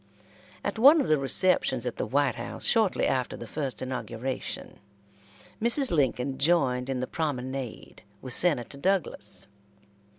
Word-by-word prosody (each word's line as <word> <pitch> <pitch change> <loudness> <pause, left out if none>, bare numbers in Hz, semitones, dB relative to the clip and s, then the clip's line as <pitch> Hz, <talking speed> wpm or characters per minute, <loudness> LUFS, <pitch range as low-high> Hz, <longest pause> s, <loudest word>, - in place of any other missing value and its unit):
At - - -3
one 285 +7 +8
of 280 - 0
the 155 -2 +3
receptions 135 -3 +2
at 125 - -4
the - - -2
White 140 -1 +1
House, 110 +1 -6
shortly 220 -4 +3
after 130 -2 -1
the - - -8
first 135 +1 -4
inauguration, 130 0 -5 0.8
Mrs. 240 +4 +2
Lincoln 135 -3 0
joined 135 -5 +2
in 130 -2 -2
the - - -1
promenade 130 -5 -5 0.2
with 130 -2 -5
Senator 140 -5 0
Douglas. 175 - 0
135 Hz, 135 wpm, -27 LUFS, 125-170 Hz, 0.8 s, one